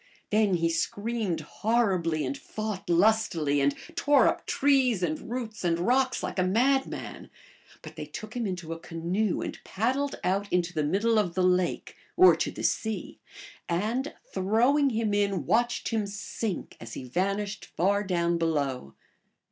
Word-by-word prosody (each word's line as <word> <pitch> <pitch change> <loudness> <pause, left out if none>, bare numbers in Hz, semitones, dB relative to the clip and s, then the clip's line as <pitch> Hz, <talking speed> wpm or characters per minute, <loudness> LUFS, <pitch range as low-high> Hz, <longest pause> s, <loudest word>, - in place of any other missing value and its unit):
Then 210 -3 +3
he 165 -1 +1
screamed 200 +3 -1
horribly 185 -9 0
and 130 +1 -2
fought 205 +4 -5
lustily, 170 -6 +3
and 140 0 +2 0.2
tore 285 -4 +4
up - - -1
trees 260 -8 +2
and 155 -2 -2
roots 230 -4 -5
and 170 -1 +2
rocks 255 +8 +1
like - - -3
a - - +4
madman; 255 +8 0 0.5
but - - -10
they - - -6
took 215 +2 -8
him 235 -3 -1
into 175 -3 -4
a 165 - -8
canoe 175 +5 -1
and - - -7
paddled 265 +7 -1
out 195 +2 0
into 175 -1 +1
the 155 - 0
middle 210 +8 +2
of 175 -5 -1
the 185 - +2
lake 180 -1 +1 0.2
(or 370 - +8
to - - -1
the - - -7
sea), 220 -1 -2 0.5
and, 220 - -1 0.2
throw 220 +8 +3
ing 285 -2 +3
him 220 -3 -1
in, 200 -6 +1
watched 240 - +1
him 220 -3 -1
sink 200 0 -5
as 115 0 -8
he - - -6
vanished 195 +9 -2
far 200 +4 +2
down 170 -3 0
below. 140 - -1
200 Hz, 160 wpm, -28 LUFS, 170-225 Hz, 0.5 s, or